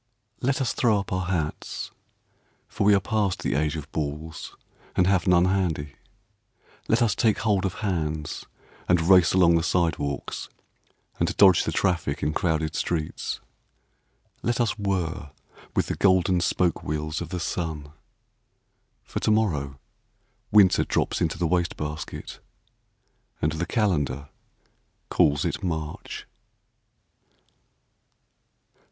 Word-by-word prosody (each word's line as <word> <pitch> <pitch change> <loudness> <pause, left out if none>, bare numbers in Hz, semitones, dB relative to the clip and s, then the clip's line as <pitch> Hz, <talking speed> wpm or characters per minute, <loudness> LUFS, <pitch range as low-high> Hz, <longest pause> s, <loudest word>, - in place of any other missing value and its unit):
Let 135 +2 +1
us 130 - 0
throw 115 -4 +3
up 100 -1 -5
our 95 -1 -1
hats, 85 -4 -3 0.8
For 105 -2 -2
we 105 0 +6
are - - +4
past 100 -2 -1
the - - 0
age 75 +2 0
of 75 -1 -7
balls 75 +1 -5 0.4
And 90 - +4
have 95 -1 +2
none 90 -1 +5
handy. 85 -7 0 0.9
Let 115 +2 +3
us 110 -5 +2
take 110 +2 +2
hold 100 -4 +1
of 95 - -2
hands, 80 -5 -2 0.4
And 90 -1 +5
race 90 +1 +5
along 85 -3 +5
the - - +1
sidewalks, 80 -5 -1 0.7
And - - 0
dodge 95 -3 +6
the - - -1
traffic 85 -4 0
in 75 - +1
crowded 80 -2 0
streets. 80 -3 -2 1.0
Let 120 0 0
us 115 -3 +1
whir 95 -6 -2 0.5
with - - +2
the - - -2
golden 95 -2 +3
spoke 90 0 +1
wheels 75 +1 -3
Of 85 - -5
the 90 0 -3
sun. 80 -4 -3 1.1
For - - -4
to - - 0
morrow 75 -11 +1 0.7
Winter 100 -3 +6
drops - - -1
into - - 0
the 90 - 0
waste 85 +1 0
basket, 75 +1 -6 1.0
And 75 - +1
the 80 +3 -3
calendar 70 - 0 0.8
calls 70 0 +3
it - - -2
March. 80 -4 -4
85 Hz, 130 wpm, -25 LUFS, 75-95 Hz, 1.1 s, we